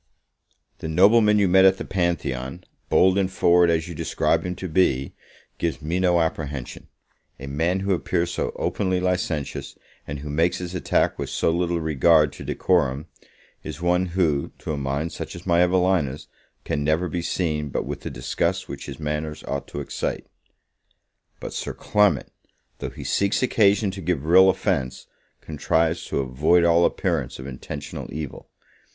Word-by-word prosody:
The -, -, -5 dB
nobleman 105 Hz, +6 st, +5 dB
you 100 Hz, -2 st, +3 dB
met 95 Hz, +1 st, +5 dB
at 95 Hz, 0 st, +6 dB
the -, -, -6 dB
Pantheon, 85 Hz, -5 st, -2 dB, 0.3 s
bold 95 Hz, +1 st, +4 dB
and 95 Hz, -1 st, 0 dB
forward 90 Hz, -2 st, +4 dB
as 80 Hz, 0 st, +1 dB
you 85 Hz, -, -6 dB
describe 75 Hz, -, 0 dB
him 90 Hz, -, -3 dB
to 95 Hz, -, -5 dB
be, 75 Hz, -6 st, +1 dB, 0.5 s
gives 85 Hz, -2 st, -1 dB
me 85 Hz, +4 st, -2 dB
no 90 Hz, -2 st, +3 dB
apprehension; 75 Hz, -5 st, -4 dB, 0.5 s
a 65 Hz, -, -7 dB
man 80 Hz, +7 st, -1 dB
who 100 Hz, 0 st, +1 dB
appears 85 Hz, -1 st, -1 dB
so -, -, -2 dB
openly 95 Hz, -2 st, -1 dB
licentious, 90 Hz, -5 st, -2 dB, 0.3 s
and 70 Hz, -, -4 dB
who 75 Hz, -, -7 dB
makes 85 Hz, +4 st, +1 dB
his 90 Hz, -1 st, -6 dB
attack 90 Hz, -, 0 dB
with -, -, -3 dB
so -, -, +1 dB
little 85 Hz, 0 st, 0 dB
regard 80 Hz, 0 st, +3 dB
to -, -, -9 dB
decorum, 75 Hz, -6 st, 0 dB, 0.6 s
is 75 Hz, -1 st, -7 dB
one 90 Hz, +1 st, +1 dB
who, 75 Hz, -6 st, +1 dB
to 80 Hz, -, -4 dB
a -, -, -1 dB
mind 70 Hz, +3 st, -2 dB
such -, -, -7 dB
as 85 Hz, -, -10 dB
my 85 Hz, -1 st, +3 dB
Evelina's, 90 Hz, -6 st, +1 dB, 0.4 s
can 75 Hz, -, -1 dB
never 80 Hz, +4 st, +1 dB
be 85 Hz, +1 st, -3 dB
seen 75 Hz, -4 st, -2 dB
but -, -, -2 dB
with -, -, -5 dB
the -, -, -5 dB
disgust -, -, -2 dB
which -, -, -7 dB
his -, -, -8 dB
manners 75 Hz, 0 st, -4 dB
ought 70 Hz, -, -4 dB
to 70 Hz, -, -5 dB
excite. 70 Hz, -, -4 dB, 1.1 s
But -, -, -7 dB
Sir -, -, -4 dB
Clement, 105 Hz, -10 st, +1 dB, 0.5 s
though -, -, -4 dB
he -, -, -10 dB
seeks 100 Hz, +5 st, +1 dB
occasion 105 Hz, -4 st, +3 dB
to 95 Hz, 0 st, -8 dB
give 80 Hz, -4 st, -1 dB
real 95 Hz, +3 st, +7 dB
offence, 85 Hz, -10 st, -1 dB, 0.4 s
contrives 80 Hz, +2 st, 0 dB
to -, -, -1 dB
avoid 75 Hz, +7 st, +2 dB
all 85 Hz, 0 st, +4 dB
appearance -, -, -1 dB
of 65 Hz, -, -9 dB
intentional 70 Hz, +2 st, -7 dB
evil. 75 Hz, -2 st, -7 dB
85 Hz, 170 wpm, -23 LUFS, 75-90 Hz, 1.1 s, real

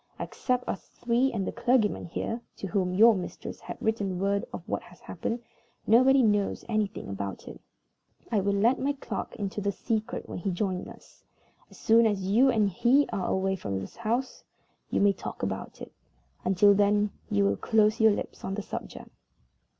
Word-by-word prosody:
Except 250 Hz, -1 st, -2 dB
us 190 Hz, -, -4 dB
three, 245 Hz, +3 st, 0 dB
and 200 Hz, -4 st, -2 dB
the -, -, -2 dB
clergyman 240 Hz, -4 st, +1 dB
here 230 Hz, +7 st, -3 dB, 0.2 s
(to -, -, -5 dB
whom 185 Hz, -1 st, 0 dB
your 225 Hz, +5 st, +7 dB
mistress 185 Hz, -3 st, -6 dB
has -, -, -8 dB
written 205 Hz, -4 st, -1 dB
word 200 Hz, +1 st, 0 dB
of -, -, -8 dB
what -, -, -2 dB
has -, -, -17 dB
happened), 235 Hz, +1 st, -4 dB, 0.4 s
nobody 260 Hz, +4 st, +5 dB
knows 205 Hz, -2 st, +1 dB
anything 215 Hz, -3 st, -2 dB
about 100 Hz, 0 st, -5 dB
it. -, -, -10 dB, 0.7 s
I 220 Hz, -, +3 dB
will 200 Hz, +1 st, +1 dB
let 230 Hz, +6 st, +3 dB
my 280 Hz, +2 st, 0 dB
clerk 235 Hz, -7 st, -6 dB
into 205 Hz, 0 st, -4 dB
the 200 Hz, 0 st, 0 dB
secret 220 Hz, +1 st, -3 dB
when -, -, -6 dB
he 185 Hz, -, -2 dB
joins 185 Hz, 0 st, -2 dB
us. -, -, -15 dB, 0.5 s
As -, -, -16 dB
soon 225 Hz, 0 st, +5 dB
as 200 Hz, -3 st, -1 dB
you 225 Hz, +8 st, +4 dB
and 220 Hz, -5 st, +3 dB
he 245 Hz, +9 st, +3 dB
are 185 Hz, -, -1 dB
away 190 Hz, 0 st, 0 dB
from 100 Hz, -, -3 dB
the 95 Hz, -, -8 dB
house, 255 Hz, -, -2 dB, 0.5 s
you -, -, 0 dB
may 200 Hz, 0 st, +5 dB
talk -, -, -7 dB
about 95 Hz, 0 st, -4 dB
it. -, -, -9 dB, 0.5 s
Until 195 Hz, +2 st, +5 dB
then, 205 Hz, +1 st, +2 dB, 0.2 s
you 100 Hz, 0 st, +2 dB
will 100 Hz, 0 st, +2 dB
close 215 Hz, -, +2 dB
your 220 Hz, 0 st, +7 dB
lips 205 Hz, -, -5 dB
on 195 Hz, -, -3 dB
the 205 Hz, -, -4 dB
subject." -, -, -7 dB
205 Hz, 185 wpm, -28 LUFS, 190-230 Hz, 0.7 s, your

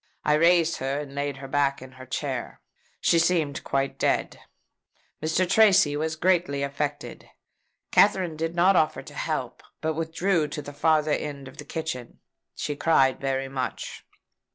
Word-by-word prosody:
I 150 Hz, -, +4 dB
raised 165 Hz, +1 st, +4 dB
her, 135 Hz, +2 st, -2 dB
and 140 Hz, -2 st, -9 dB
laid 140 Hz, -1 st, -3 dB
her 135 Hz, 0 st, -8 dB
back 140 Hz, 0 st, +1 dB
in 130 Hz, 0 st, -11 dB
her 130 Hz, 0 st, -12 dB
chair. 130 Hz, -, -4 dB, 0.4 s
She 170 Hz, -, +4 dB
seemed 165 Hz, -5 st, +1 dB
quite 135 Hz, 0 st, -1 dB
dead. -, -, 0 dB, 0.8 s
Mr. 160 Hz, +4 st, +1 dB
Tracy 195 Hz, -8 st, +5 dB
was 155 Hz, +1 st, -2 dB
greatly 165 Hz, -4 st, +1 dB
affected. 140 Hz, +1 st, -4 dB, 0.6 s
Katherine 190 Hz, -5 st, +3 dB
did 165 Hz, +2 st, -3 dB
not 185 Hz, +3 st, +4 dB
offer 155 Hz, -2 st, +1 dB
to -, -, -12 dB
help, -, -, -3 dB, 0.2 s
but 160 Hz, 0 st, -1 dB
withdrew 165 Hz, +1 st, 0 dB
to 150 Hz, 0 st, -5 dB
the 145 Hz, -, -9 dB
farther 155 Hz, +1 st, +2 dB
end 140 Hz, -2 st, -3 dB
of -, -, -13 dB
the -, -, -9 dB
kitchen. 155 Hz, -7 st, -5 dB, 0.4 s
She 145 Hz, -, -3 dB
cried 135 Hz, -4 st, +3 dB
very 135 Hz, -1 st, -1 dB
much. 130 Hz, -1 st, -5 dB
150 Hz, 155 wpm, -26 LUFS, 140-165 Hz, 0.8 s, Tracy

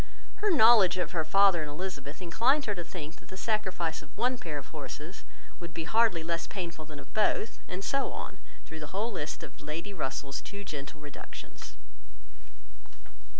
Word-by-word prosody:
Her 420 Hz, -, +2 dB
knowledge 220 Hz, -, +8 dB
of 180 Hz, -, 0 dB
her 165 Hz, -3 st, +1 dB
father 190 Hz, +1 st, +6 dB
and 150 Hz, -, -3 dB
Elizabeth 150 Hz, -1 st, -5 dB
inclined 245 Hz, -, +3 dB
her 210 Hz, -, +1 dB
to 175 Hz, -3 st, -4 dB
think 160 Hz, -2 st, -7 dB
that -, -, -19 dB
the 190 Hz, -, -7 dB
sacrifice 190 Hz, -6 st, 0 dB
of 150 Hz, +1 st, -16 dB
one 250 Hz, +3 st, +2 dB
pair 155 Hz, -3 st, -3 dB
of 140 Hz, -, -7 dB
horses 155 Hz, +3 st, -7 dB, 0.4 s
would 170 Hz, -2 st, -7 dB
be 165 Hz, -, -1 dB
hardly 220 Hz, -2 st, +3 dB
less 165 Hz, 0 st, -1 dB
painful 170 Hz, -4 st, -5 dB
than 150 Hz, -1 st, -9 dB
of -, -, -11 dB
both, 215 Hz, 0 st, +2 dB
and 185 Hz, +2 st, -4 dB
so 275 Hz, +5 st, +1 dB
on, -, -, -6 dB, 0.3 s
through 160 Hz, -, -7 dB
the 155 Hz, +5 st, -5 dB
whole 225 Hz, +3 st, +1 dB
list 150 Hz, -7 st, -3 dB
of -, -, -10 dB
Lady 165 Hz, +7 st, -4 dB
Russell's 135 Hz, -4 st, -2 dB
too 200 Hz, 0 st, -7 dB
gentle 150 Hz, -3 st, -6 dB
reductions. 145 Hz, -2 st, -9 dB
170 Hz, 180 wpm, -31 LUFS, 155-200 Hz, 0.4 s, knowledge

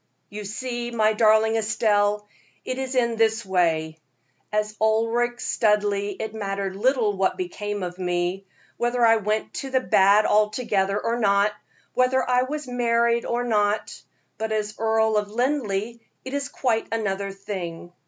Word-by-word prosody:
"You 210 Hz, 0 st, -6 dB
see, 240 Hz, +3 st, -4 dB
my 220 Hz, -2 st, +2 dB
darling 220 Hz, 0 st, +4 dB
Estelle, 210 Hz, -1 st, +1 dB, 0.4 s
it 255 Hz, +1 st, -3 dB
is 265 Hz, 0 st, -3 dB
in 235 Hz, -2 st, +1 dB
this 225 Hz, 0 st, +2 dB
way: 160 Hz, -4 st, 0 dB, 0.5 s
As 210 Hz, 0 st, -1 dB
Ulric 230 Hz, +2 st, +1 dB
Studleigh 205 Hz, -2 st, +1 dB
it 220 Hz, -1 st, -4 dB
mattered 195 Hz, -2 st, -3 dB
little 230 Hz, -1 st, +1 dB
what 190 Hz, 0 st, 0 dB
became 205 Hz, -, -4 dB
of 180 Hz, +1 st, -6 dB
me 180 Hz, +1 st, -2 dB, 0.3 s
whether 240 Hz, 0 st, +1 dB
I 225 Hz, 0 st, +5 dB
went 215 Hz, +1 st, -2 dB
to 270 Hz, -, -6 dB
the 260 Hz, 0 st, +2 dB
bad 200 Hz, -1 st, +4 dB
altogether 210 Hz, -2 st, +1 dB
or 235 Hz, +1 st, -1 dB
not, 200 Hz, -1 st, +3 dB, 0.4 s
whether 255 Hz, +1 st, +2 dB
I 250 Hz, 0 st, +3 dB
was 290 Hz, +2 st, -4 dB
married 235 Hz, -1 st, +1 dB
or 240 Hz, +1 st, -1 dB
not; 210 Hz, -2 st, 0 dB, 0.4 s
but 220 Hz, 0 st, -2 dB
as 215 Hz, -1 st, -1 dB
Earl 220 Hz, -1 st, +2 dB
of 210 Hz, -1 st, -1 dB
Linleigh 235 Hz, -2 st, -1 dB, 0.3 s
it 260 Hz, -, -6 dB
is 285 Hz, 0 st, -2 dB
quite 235 Hz, -6 st, -1 dB
another 200 Hz, -3 st, -2 dB
thing. 180 Hz, -4 st, -7 dB
215 Hz, 150 wpm, -24 LUFS, 200-235 Hz, 0.5 s, I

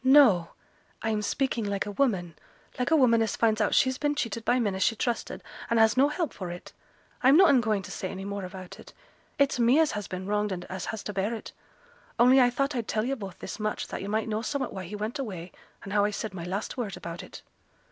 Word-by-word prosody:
'No. 260 Hz, -, +6 dB, 0.5 s
I'm 220 Hz, -1 st, 0 dB
speaking 240 Hz, +1 st, -1 dB
like 200 Hz, -1 st, -1 dB
a 205 Hz, -, -4 dB
woman; 195 Hz, -, 0 dB, 0.4 s
like 250 Hz, -, +1 dB
a 320 Hz, -, +5 dB
woman 240 Hz, -6 st, +5 dB
as 220 Hz, -2 st, 0 dB
finds 220 Hz, -1 st, +2 dB
out 215 Hz, -, +2 dB
she's 260 Hz, 0 st, +3 dB
been 295 Hz, -1 st, 0 dB
cheated 230 Hz, -4 st, -2 dB
by 245 Hz, +2 st, +2 dB
men 210 Hz, -5 st, 0 dB
as 190 Hz, -, -4 dB
she 225 Hz, -, +3 dB
trusted, 235 Hz, +2 st, -3 dB, 0.3 s
and 230 Hz, -, +3 dB
as 220 Hz, 0 st, +6 dB
has 235 Hz, -, -6 dB
no 275 Hz, +2 st, +6 dB
help 305 Hz, -2 st, -2 dB
for 185 Hz, -3 st, -6 dB
it. 175 Hz, 0 st, -9 dB, 0.5 s
I'm 265 Hz, +4 st, +6 dB
noane 320 Hz, -9 st, +6 dB
going 215 Hz, -3 st, 0 dB
to -, -, -9 dB
say 185 Hz, -, -4 dB
any 195 Hz, 0 st, -6 dB
more 200 Hz, 0 st, -4 dB
about 185 Hz, 0 st, -9 dB
it. -, -, -13 dB, 0.4 s
It's 280 Hz, -3 st, +2 dB
me 240 Hz, +4 st, +5 dB
as 320 Hz, -2 st, +3 dB
has 210 Hz, -2 st, -4 dB
been 185 Hz, 0 st, -5 dB
wronged, 210 Hz, +1 st, 0 dB
and 175 Hz, -1 st, -4 dB
as 185 Hz, 0 st, -5 dB
has 220 Hz, -, -5 dB
to 210 Hz, -, -5 dB
bear 200 Hz, +4 st, -1 dB
it: 225 Hz, -, -8 dB, 0.7 s
only 250 Hz, +3 st, +6 dB
I 245 Hz, -, +5 dB
thought 275 Hz, +3 st, -1 dB
I'd 235 Hz, -3 st, -2 dB
tell 215 Hz, 0 st, 0 dB
yo' 265 Hz, -, 0 dB
both 195 Hz, -7 st, -8 dB
this -, -, -7 dB
much, 215 Hz, 0 st, -2 dB
that -, -, -5 dB
yo' 195 Hz, -, -5 dB
might 215 Hz, +2 st, -1 dB
know 215 Hz, 0 st, -1 dB
somewhat 280 Hz, +3 st, -2 dB
why 190 Hz, -2 st, -6 dB
he 200 Hz, +5 st, -7 dB
went 215 Hz, +7 st, -4 dB
away, 185 Hz, -9 st, -5 dB, 0.3 s
and 200 Hz, -, -6 dB
how 205 Hz, -1 st, +4 dB
I 205 Hz, -, +2 dB
said 210 Hz, 0 st, -4 dB
my 170 Hz, -3 st, -6 dB
last 195 Hz, +8 st, -4 dB
word 215 Hz, -6 st, -3 dB
about 170 Hz, 0 st, -7 dB
it.' -, -, -11 dB
215 Hz, 250 wpm, -28 LUFS, 195-250 Hz, 0.7 s, No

